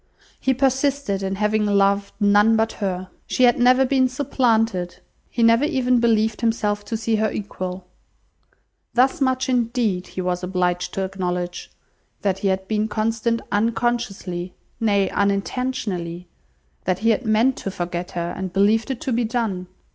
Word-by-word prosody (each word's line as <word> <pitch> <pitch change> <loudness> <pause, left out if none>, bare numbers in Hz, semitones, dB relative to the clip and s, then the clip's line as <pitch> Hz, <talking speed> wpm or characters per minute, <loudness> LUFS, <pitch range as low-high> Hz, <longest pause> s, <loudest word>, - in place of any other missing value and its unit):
He 265 0 +1
persisted 270 -5 +1
in 195 0 -2
having 210 +1 +1
loved 200 -1 +2
none 205 +2 +5
but 225 0 +1
her. 185 -1 -2 0.2
She 255 - +1
had 245 +2 +5
never 255 +2 +5
been 260 -1 +2
supplanted. 225 -8 0 0.3
He 235 - -1
never 230 +3 +5
even 255 -5 +2
believed 225 -2 +2
himself 210 -3 0
to 225 - -3
see 225 0 0
her 220 0 +1
equal. 185 -3 -5 1.1
Thus 265 +6 +3
much 260 0 +1
indeed 235 -7 0
he - - -8
was 180 0 -1
obliged 180 -1 -1
to 195 - -1
acknowledge: 180 -2 -3 0.5
that 195 -2 0
he 195 - -1
had 190 0 -1
been 215 0 0
constant 225 +1 -1
unconsciously, 215 -5 -1 0.2
nay 200 -3 +2
unintentionally; 200 -4 -2 0.6
that 185 -1 +1
he 230 - +6
had 225 - 0
meant 225 +4 +3
to - - -4
forget 175 -1 -4
her, 175 0 -3
and 190 -1 -4
believed 210 +5 +2
it 265 -3 -4
to 265 - -2
be 240 +1 +1
done. 220 -6 -2
215 Hz, 155 wpm, -22 LUFS, 190-240 Hz, 1.1 s, he